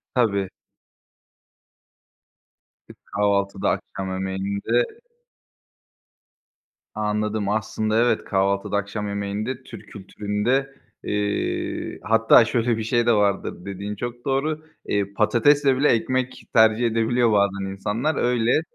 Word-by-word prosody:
Tabii. 100 -6 +1 2.4
E, - - -12
kahvaltıda, 100 -1 0
akşam 95 -1 -3
yemeğinde 100 - -1 2.0
Anladım, 105 -1 -1
aslında 110 0 -1
evet, 120 -1 +2
kahvaltıda, 100 +1 0
akşam 100 +1 -3
yemeğinde, 100 +5 -3
Türk 110 -2 -11
kültüründe, 105 +7 -2 0.3
eee, 105 0 -2
hatta 115 +1 +5
şöyle 115 0 0
bir 110 - -3
şey 120 +1 +1
de 120 - +4
vardır, 100 -3 0
dediğin 100 +1 -5
çok 120 +3 -6
doğru. 150 +3 -1 0.2
Eee, 100 -1 -1
patatesle 130 +6 +3
bile, 145 - +3
ekmek 130 +3 0
tercih 110 +1 +5
edebiliyor 115 +1 +2
bazen 100 -1 +1
insanlar. 110 +10 -2
Öyle, 120 +4 +2
110 Hz, 100 wpm, -23 LUFS, 100-120 Hz, 2.4 s, hatta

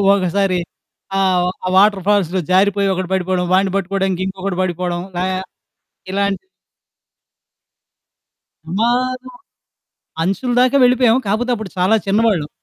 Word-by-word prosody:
ఒకసారి 185 0 0 0.6
ఆహ్, 185 -2 +2 0.2
ఆ - - 0
వాటర్ 200 -2 +4
ఫాల్స్‌లో 190 -3 +2
జారిపోయి 200 +1 +3
ఒకడు 185 -1 -4
పడిపోవడం, 185 -1 0
వాడిని 190 0 +3
పట్టుకోవడానికి 195 -1 -1
ఇంకొకడు 190 -1 -4
పడిపోవడం 175 -1 -2 0.2
లా 180 - 0 0.9
ఇలాంటివి. 200 - -2 2.2
ప్రమాదం. 250 +7 -1 0.9
అంచుల 195 +8 -1
దాకా 255 +2 +3
వెళ్ళిపోయాము, 250 0 +4
కాకపోతే 220 +5 0
అప్పుడు 215 -5 -7
చాలా 185 +5 +3
చిన్నవాళ్ళం. 200 -7 +1
195 Hz, 105 wpm, -18 LUFS, 185-220 Hz, 2.2 s, వాటర్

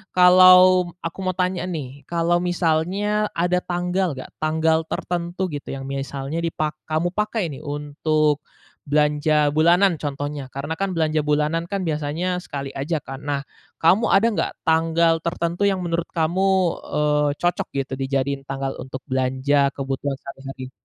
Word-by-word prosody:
kalau 185 0 +7
aku 165 +3 -5
mau 185 -1 -1
tanya 180 -1 -1
nih, 140 -5 -6
kalau 170 0 +1
misalnya 180 +5 0
ada 180 +1 +1
tanggal 180 -2 -1
nggak, 130 - -9
tanggal 160 +1 +2
tertentu 175 +1 -3
gitu 145 -1 -6
yang 135 - -6
misalnya 140 +3 -4
dipak 155 -2 -2
kamu 160 +3 0
pakai 210 -4 -1
nih, 135 - -8
untuk 150 +1 0 0.5
belanja 150 0 +2
bulanan, 175 +2 +4
contohnya, 145 -1 -4
karena 140 +4 -3
kan, 195 -1 0
belanja 155 -1 +1
bulanan 155 +3 +1
kan, 195 -2 -1
biasanya 160 +4 -1
sekali 140 -2 -5
aja 155 +4 -2
kan. 135 0 -7
Nah, 145 -1 -1 0.4
kamu 190 +8 +4
ada 205 +4 +5
nggak - - -1 0.2
tanggal 165 +1 +3
tertentu 170 +2 -2
yang 190 - 0
menurut 170 0 -1
kamu, 170 +3 0 0.5
eee, 150 0 +2
cocok 175 0 0
gitu, 135 -1 -2
dijadiin 135 +1 -1
tanggal 135 0 -3
untuk 130 0 -7
belanja 130 +2 +1
kebutuhan 135 0 -3
sehari-hari? 135 -1 -9
155 Hz, 145 wpm, -22 LUFS, 140-175 Hz, 0.5 s, kalau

